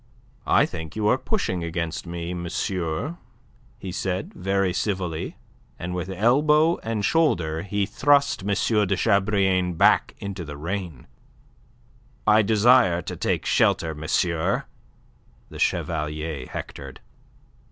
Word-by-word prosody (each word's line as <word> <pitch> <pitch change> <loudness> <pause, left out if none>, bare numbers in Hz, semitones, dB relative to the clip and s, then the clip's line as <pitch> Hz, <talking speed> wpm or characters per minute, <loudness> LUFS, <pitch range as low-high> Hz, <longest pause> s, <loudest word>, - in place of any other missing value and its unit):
"I - - +5
think 80 -2 -7
you 105 -1 0
are 125 - +4
pushing 95 - -2
against 85 0 -3
me, 85 +1 -4
monsieur," 90 - -3 0.6
he 95 - -7
said, 95 +1 -3
very 95 0 0
civilly, 90 -6 -3 0.4
and 90 +1 -5
with 90 +1 -4
elbow 150 - +3
and 110 -2 -2
shoulder 85 - +1
he 100 +2 -1
thrust 140 +1 +2
M. 95 - -6 0.4
de 100 - +1
Chabrillane 95 -3 +2
back - - +4
into 100 -3 -6
the 75 -2 -8
rain. 85 -3 -5 1.2
"I 110 0 +6
desire 105 -4 +4
to - - -5
take - - -1
shelter, 80 -1 +2
monsieur," 80 +2 0 0.8
the - - -10
Chevalier 75 -3 -2
hectored. - - -8
95 Hz, 120 wpm, -24 LUFS, 85-105 Hz, 1.2 s, I